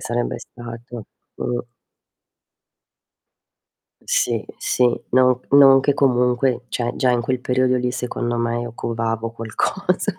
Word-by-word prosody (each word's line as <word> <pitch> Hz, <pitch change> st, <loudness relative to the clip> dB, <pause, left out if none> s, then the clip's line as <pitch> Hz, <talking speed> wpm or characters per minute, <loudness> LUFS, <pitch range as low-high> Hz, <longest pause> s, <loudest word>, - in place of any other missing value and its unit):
sarebbe 120 Hz, +1 st, -2 dB
stato. 120 Hz, -1 st, -9 dB, 0.3 s
Mh. 120 Hz, 0 st, -2 dB, 2.4 s
Sì, -, -, 0 dB
sì, 125 Hz, -, +1 dB, 0.3 s
non 125 Hz, 0 st, +4 dB
c -, -, -31 dB
non 135 Hz, -1 st, +8 dB
che 140 Hz, +1 st, +2 dB
comunque 125 Hz, -2 st, +1 dB
cioè, 120 Hz, -1 st, -2 dB
già 130 Hz, -, +2 dB
in 120 Hz, -1 st, +2 dB
quel 125 Hz, +1 st, -2 dB
periodo 130 Hz, 0 st, +1 dB
lì 125 Hz, 0 st, -1 dB
secondo 120 Hz, -1 st, -3 dB
me 115 Hz, 0 st, -1 dB
io 120 Hz, -1 st, -6 dB
covavo 115 Hz, -1 st, -2 dB
qualcosa. 180 Hz, -, -1 dB
125 Hz, 125 wpm, -21 LUFS, 120-130 Hz, 2.4 s, non